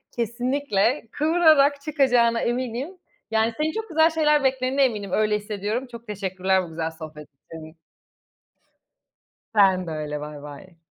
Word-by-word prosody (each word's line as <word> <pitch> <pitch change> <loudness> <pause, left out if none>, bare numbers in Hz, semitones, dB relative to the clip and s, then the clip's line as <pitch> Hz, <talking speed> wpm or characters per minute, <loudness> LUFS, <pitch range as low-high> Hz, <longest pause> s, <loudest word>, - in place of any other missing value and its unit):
kesinlikle 240 0 -1
kıvırarak 300 -3 +3
çıkacağına 250 -6 +2
eminim. 255 +8 -3 0.3
Yani, 225 +1 +1
seni 310 +1 -1
çok 445 -2 -5
güzel 320 0 +4
şeyler 300 -3 +2
beklediğine 265 +1 +1
eminim, 210 -6 -1
öyle 215 0 +1
hissediyorum. 210 +4 -4
Çok 235 -1 -11
teşekkürler 190 -2 -1
bu 175 - -9
güzel 160 0 -4
sohbet 155 -2 -10
için. 155 +3 -13 1.8
Sen 190 -3 +4
de - - -4
öyle, 150 -1 -4
baybay. 150 +4 -10
230 Hz, 125 wpm, -23 LUFS, 185-275 Hz, 1.8 s, güzel